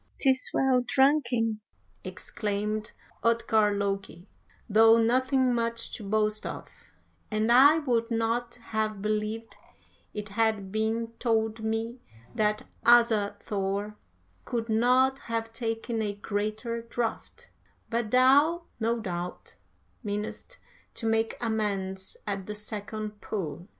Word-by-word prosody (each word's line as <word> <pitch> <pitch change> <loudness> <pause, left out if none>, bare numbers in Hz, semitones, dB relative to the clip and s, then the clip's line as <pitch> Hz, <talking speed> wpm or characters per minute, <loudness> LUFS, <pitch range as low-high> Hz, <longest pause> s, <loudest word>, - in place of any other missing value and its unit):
"''Tis 265 -2 +5
well 260 -2 +3
drunken,' 245 -5 +2 0.4
exclaimed 210 0 -3 0.3
Utgard 220 -3 +2
Loki, 195 -2 -3 0.4
'though 225 +1 +6
nothing 255 +2 +2
much 230 -1 -2
to 220 - -6
boast 215 +1 0
of; - - -6 0.6
and 215 +1 +1
I 280 +6 +7
would 240 -6 0
not 230 +1 -1
have 220 -3 -3
believed 215 +1 -2 0.7
had 220 +1 +2
it 195 -1 -10
been 220 +2 -1
told 220 -2 0
me 225 +2 -2 0.3
that 210 -1 +1 0.2
Asa 230 -4 +5
Thor 200 +1 -2 0.5
could 230 -1 -3
not 255 +4 +3
have 225 -2 -4
taken 225 -1 -2
a 205 -1 -1
greater 215 +3 -3
draught, 230 0 -4 0.4
but 230 -1 -1
thou 280 +8 +4 0.2
no 230 +1 0
doubt 180 -4 -6 0.5
meanest 210 - -5 0.4
to 230 - -5
make 225 0 +1
amends 195 -4 -2
at 195 -2 -4
the 210 - -4
second 210 0 -6
pull.' 175 -4 -5
225 Hz, 115 wpm, -28 LUFS, 210-235 Hz, 0.7 s, I